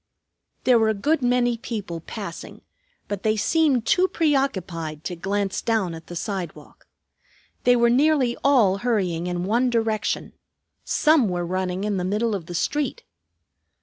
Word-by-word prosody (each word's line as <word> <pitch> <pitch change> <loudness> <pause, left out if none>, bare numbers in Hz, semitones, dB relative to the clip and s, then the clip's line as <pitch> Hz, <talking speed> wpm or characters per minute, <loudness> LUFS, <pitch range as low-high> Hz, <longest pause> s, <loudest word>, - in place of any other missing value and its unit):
There 250 -2 +5
were 220 -1 +3
a 220 - +1
good 290 +9 +1
many 245 -1 +1
people 205 -8 -5
passing, 170 +1 -8 0.5
but 205 -2 -4
they 215 +1 +1
seemed 280 -1 +2
too 375 -2 +3
preoccupied 190 - -1
to 180 - -4
glance 195 +2 -2
down 220 -7 0
at 165 0 -10
the 175 - -8
sidewalk. 175 -5 -6 0.8
They 245 - +6
were 235 0 +4
nearly 265 -2 +3
all 235 -9 +4
hurrying 185 -8 0
in 175 0 -2
one 235 +6 +2
direction. 225 -2 -1 0.5
Some 300 - +3
were 175 -1 -2
running 185 +1 -2
in 210 -2 -1
the 180 - -2
middle 210 +4 0
of 180 -5 -4
the 175 - -6
street. 295 - -1
215 Hz, 150 wpm, -23 LUFS, 180-245 Hz, 0.8 s, They